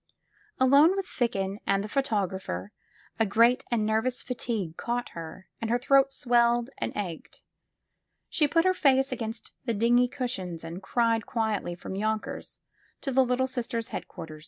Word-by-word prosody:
Alone 280 +7 +6
with 390 -1 -2
Ficken 200 - -1
and 195 0 +2
the - - -4
photographer, 190 - -2 0.5
a 225 - +4
great 230 +5 +4
and 230 -3 +1
nervous 225 +4 0
fatigue 225 -9 -3
caught 240 +4 -2
her 165 +2 -9
and 225 - -2
her 240 - +3
throat 275 +2 +4
swelled 240 -1 +2
and - - -2
ached. 180 -6 -6 0.8
She 300 - +2
put 330 +4 +2
her 370 - +4
face 270 -5 +3
against 225 -1 -5
the 235 -3 0
dingy 240 +3 +4
cushions 240 - -4
and 165 +3 -7
cried 230 -2 +1
quietly 220 -6 -1
from 175 - -7
Tonkers 215 +1 -3 0.4
to 275 - -2
the 265 +1 +5
Little 250 +1 +1
Sisters' 235 -3 -3
head - - -5
quarters. 160 -3 -9
235 Hz, 155 wpm, -28 LUFS, 200-255 Hz, 0.8 s, Alone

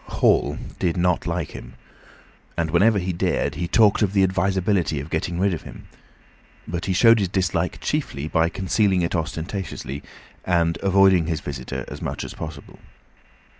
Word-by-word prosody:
Hall - - +2 0.2
did 90 0 0
not 90 0 +1
like 85 -3 -2
him, - - -10 0.8
and 80 -2 -1
whenever 100 +6 +4
he 90 -1 -1
dared 85 - 0
he 85 - -3
talked 105 +3 +4
of 100 -2 +1
the 100 -1 +4
advisability 95 -3 +1
of 70 +3 -8
getting 85 +2 -2
rid 100 0 +2
of 80 - -4
him; - - -12 0.8
but 85 +1 -3
he 95 - 0
showed 115 +4 +6
his 100 - +1
dislike 95 -1 -1
chiefly 70 +2 -2
by 80 +1 +2
concealing 95 0 +1
it 85 - -1
ostentatiously, 80 -3 -4 0.4
and 85 -2 +1
avoiding 95 -3 +4
his 80 -2 -1
visitor 65 -3 -5
as - - -8
much - - -4
as - - -7
possible. 75 -3 -9
90 Hz, 165 wpm, -23 LUFS, 80-95 Hz, 0.8 s, showed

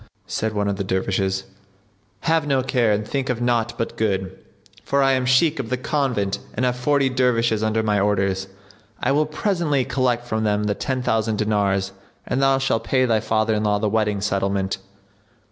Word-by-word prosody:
Said 110 0 -2
one 105 -1 0
of 100 -1 -1
the 100 - -2
Dervishes, 95 0 -1 0.8
"Have 160 -2 +1
no 135 -2 +2
care 120 -4 +2
and 105 +1 -1
think 135 -2 -2
of 125 -2 -1
naught 120 -1 0
but 115 - -3
good; 95 -3 -1 0.5
for 140 0 +1
I 135 - +4
am 130 -1 +1
Shaykh 135 +4 +3
of 120 -4 -4
the 130 - 0
Convent 125 -7 -1 0.2
and 125 - 0
have 125 -1 +1
forty 140 +2 +2
Dervishes 120 -4 +1
under 110 0 +1
my 105 -2 +1
orders. 95 -1 0 0.5
I - - +1
will 150 +2 +2
presently 155 -5 0
collect 125 -2 0
from 110 -2 -2
them 105 -1 +1
the 105 -1 +1
ten 130 +3 -3
thousand 110 -2 0
dinars 100 -2 0 0.3
and 125 +2 -1
thou 135 0 +4
shalt 135 -4 0
pay 130 -1 +2
thy 115 -3 +2
father 110 0 +1
in 105 0 0
law 105 -1 +2
the 105 +1 0
wedding 105 -2 0
settlement. 100 -1 -1
110 Hz, 190 wpm, -22 LUFS, 105-130 Hz, 0.8 s, I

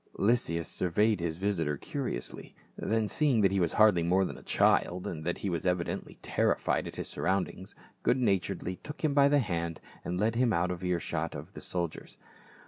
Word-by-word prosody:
Lysias 100 -7 +1
surveyed 105 +4 +1
his 85 -1 -2
visitor 85 -7 0
curiously, 140 - -5 0.2
then 110 0 0
seeing 130 +1 +2
that 95 -2 +4
he 100 - +1
was 85 -3 +1
hardly 105 -5 +5
more 90 +3 +3
than - - -5
a - - -11
child, 90 +1 +2
and 80 -2 -4
that 85 - -1
he - - -4
was 85 -4 -1
evidently 90 -2 -2
terrified - - +1
at - - -8
his - - -5
surroundings, 95 0 -2 0.3
good 125 - +3
naturedly 95 -5 0
took 150 +2 -10
him 155 -2 +2
by 140 -1 +6
the 145 - +4
hand 85 - -1 0.2
and 90 +1 -3
led 110 +2 +2
him 120 0 +2
out 90 0 +1
of 90 0 -5
ear 90 -1 +1
shot 70 - -3
of - - -8
the - - -9
soldiers. 85 -3 -4
95 Hz, 195 wpm, -30 LUFS, 85-110 Hz, 0.3 s, by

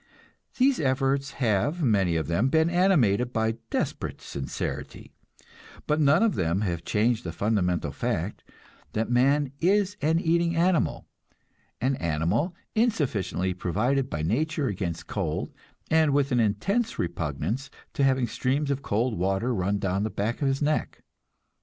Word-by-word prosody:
These 265 +1 +3
efforts 135 -1 0
have 135 - 0
many 100 - +2
of 80 -2 0
them 85 - +1
been 160 +3 +3
animated 130 - +3
by 110 -1 0
desperate - - -2
sincerity, 65 -1 -6 0.7
but 150 +1 +1
none 145 +8 +5
of 225 -4 +3
them 90 +1 0
have 85 -5 -2
changed 110 +5 +1
the 85 - -4
fundamental 90 -3 0
fact - - -3 0.5
that 110 +2 -1
man 135 +3 +3
is 200 +3 +2
an 160 +2 +2
eating 170 0 +1
animal, 170 0 +1 0.7
an 130 +2 0
animal 85 - 0 0.2
insufficiently 130 - 0
provided 120 +10 0
by 75 - -3
nature 150 - 0
against 90 -7 -3
cold, 80 -7 -3 0.4
and 160 -2 +4
with 140 -1 +2
an 125 - +3
intense 200 - 0
repugnance 85 - -3 0.2
to 140 - 0
having 130 -2 +3
streams 140 +4 -1
of 140 0 -2
cold 115 0 0
water 95 +7 0
run 100 0 0
down 95 -1 -1
back 110 +3 -2
of 140 - +2
his 135 +2 0
neck. 150 +1 -1
125 Hz, 140 wpm, -26 LUFS, 95-150 Hz, 0.7 s, none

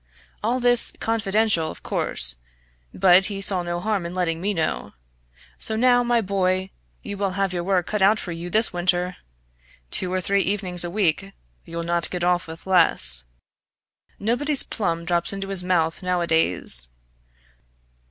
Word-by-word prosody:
All 240 +4 0
this 245 -1 +3
confidential, 215 -6 0
of - - -11
course; - - 0 0.5
but 185 0 +4
he 200 -1 -5
saw 195 -2 +4
no 175 0 -4
harm 205 0 -2
in 170 +1 -7
letting 165 -3 -2
me 200 +3 0
know. 165 -5 -3 0.7
So 220 - -1
now, 245 +2 +3
my 240 -1 +1
boy, 190 -1 -1 0.3
you 200 -1 -6
will 195 -1 -2
have 195 -2 -1
your 175 -1 -3
work 180 -2 0
cut 210 -2 -3
out 205 +3 +4
for 180 - -5
you 170 +1 -6
this 220 +2 +1
winter! 180 0 -1 0.7
Two 180 - +2
or 185 - -1
three 200 +2 +1
evenings 185 -3 +1
a 175 - -3
week 195 0 -1 0.3
you'll 170 0 -6
not 170 0 0
get 180 -1 -4
off 180 0 0
with 160 0 -11
less. 65 - +4 0.9
Nobody's 255 +7 +1
plum 170 -5 -3
drops 170 +2 -1
into 195 0 -5
his 195 -2 -1
mouth 170 -2 0
nowadays. 165 - +2
185 Hz, 160 wpm, -22 LUFS, 170-200 Hz, 0.9 s, but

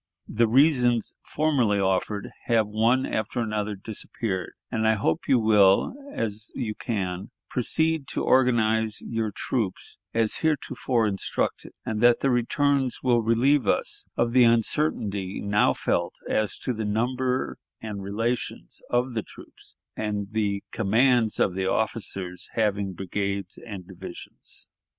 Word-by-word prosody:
The 115 +1 +2
reasons 125 -2 +3
formerly 130 -10 +1
offered 95 +1 0
have 115 -2 +3
one 115 +5 +2
after 110 +2 -2
another 105 -2 -1
disappeared, 100 -1 -4 0.2
and 110 -2 +1
I 110 - +4
hope 80 -6 -1
you 130 - +5
will, 105 - +4 0.2
as 110 - -4
you 115 -5 -2
can, 95 -5 -3 0.2
proceed 160 +3 0
to - - -2
organize 110 -4 +2
your 115 -1 -2
troops 105 -1 -3
as 115 -1 +1
heretofore 130 -6 0
instructed, 100 -2 -2
and 110 -1 -2
that 120 0 +5
the 135 - +2
returns 135 +2 +1
will 120 -2 +3
relieve 125 +6 +3
us - - 0
of 120 0 +1
the 125 -1 +7
uncertainty 110 -5 +1
now 105 +1 +3
felt - - -1
as 110 -1 0
to 125 - -3
the 110 -1 -3
number 125 +4 -1 0.2
and 105 -3 -6
relations 110 - -3
of 125 +1 +1
the 110 - -1
troops, - - -15 0.2
and 105 -2 -3
the 100 -2 -1
commands 115 +1 +2
of 95 - +2
the 95 0 -1
officers 95 -4 -2
having 100 -3 0
brigades 100 +1 -3
and 100 -6 -8
divisions.... - - -11
110 Hz, 135 wpm, -26 LUFS, 100-125 Hz, 0.2 s, the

